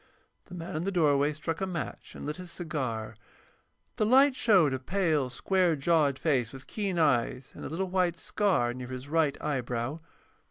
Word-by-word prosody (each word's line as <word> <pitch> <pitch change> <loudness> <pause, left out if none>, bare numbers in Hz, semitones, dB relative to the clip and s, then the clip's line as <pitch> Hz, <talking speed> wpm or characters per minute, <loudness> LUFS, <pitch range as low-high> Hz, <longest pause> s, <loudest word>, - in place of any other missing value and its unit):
The 180 - -10
man 165 -2 -6
in 155 - -1
the 195 - -1
doorway 145 -5 +3
struck 155 +3 -4
a 190 - 0
match 170 -5 -6
and - - -7
lit 150 +1 -3
his 180 -1 -8
cigar. 125 -11 -4 0.8
The 215 - +2
light 270 +4 +6
showed 185 - +4
a 130 - -2
pale, 155 -3 0
square 180 +4 +1
jawed 145 -2 +2
face 130 -8 +1
with 135 0 -11
keen 200 -4 -3
eyes, 130 -4 +1
and - - -9
a - - -5
little 185 +5 -2
white 180 -2 +2
scar 175 - +1
near 125 0 -7
his 130 +1 -7
right 155 -2 +1
eyebrow. 125 0 -2
155 Hz, 185 wpm, -29 LUFS, 130-180 Hz, 0.8 s, light